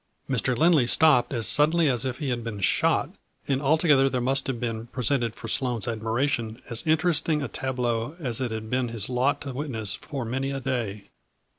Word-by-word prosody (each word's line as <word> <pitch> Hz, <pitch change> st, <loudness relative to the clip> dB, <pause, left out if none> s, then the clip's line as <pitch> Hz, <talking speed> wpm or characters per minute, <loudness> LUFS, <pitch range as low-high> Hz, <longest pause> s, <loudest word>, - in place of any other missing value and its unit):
Mr. 130 Hz, -2 st, 0 dB
Lindley 160 Hz, -4 st, +4 dB
stopped 150 Hz, -3 st, +4 dB
as 120 Hz, -4 st, 0 dB
suddenly 160 Hz, +2 st, +3 dB
as 125 Hz, -2 st, +1 dB
if 130 Hz, -1 st, -3 dB
he 145 Hz, -, -3 dB
had 120 Hz, -2 st, -2 dB
been 115 Hz, -3 st, -5 dB
shot, 95 Hz, -, +2 dB, 0.4 s
and 135 Hz, -1 st, 0 dB
altogether 150 Hz, -2 st, +4 dB
there 130 Hz, -, -1 dB
must 135 Hz, +3 st, +1 dB
have 130 Hz, -3 st, -2 dB
been 115 Hz, -1 st, -4 dB
presented 120 Hz, -1 st, 0 dB
for -, -, -8 dB
Sloane's 125 Hz, -5 st, -1 dB
admiration 115 Hz, +1 st, -1 dB
as 115 Hz, -, -1 dB
interesting 155 Hz, -1 st, +2 dB
a -, -, -2 dB
tableau 125 Hz, 0 st, -2 dB
as 130 Hz, -8 st, -3 dB
it 125 Hz, -, -1 dB
had 110 Hz, 0 st, -5 dB
been 125 Hz, +2 st, 0 dB
his 115 Hz, -2 st, -3 dB
lot 130 Hz, +3 st, +1 dB
to 140 Hz, -2 st, -5 dB
witness 120 Hz, -7 st, -3 dB
for 135 Hz, -2 st, -5 dB
many 135 Hz, +4 st, -2 dB
a 135 Hz, 0 st, -3 dB
day. 115 Hz, -7 st, -3 dB
125 Hz, 190 wpm, -26 LUFS, 115-140 Hz, 0.4 s, Lindley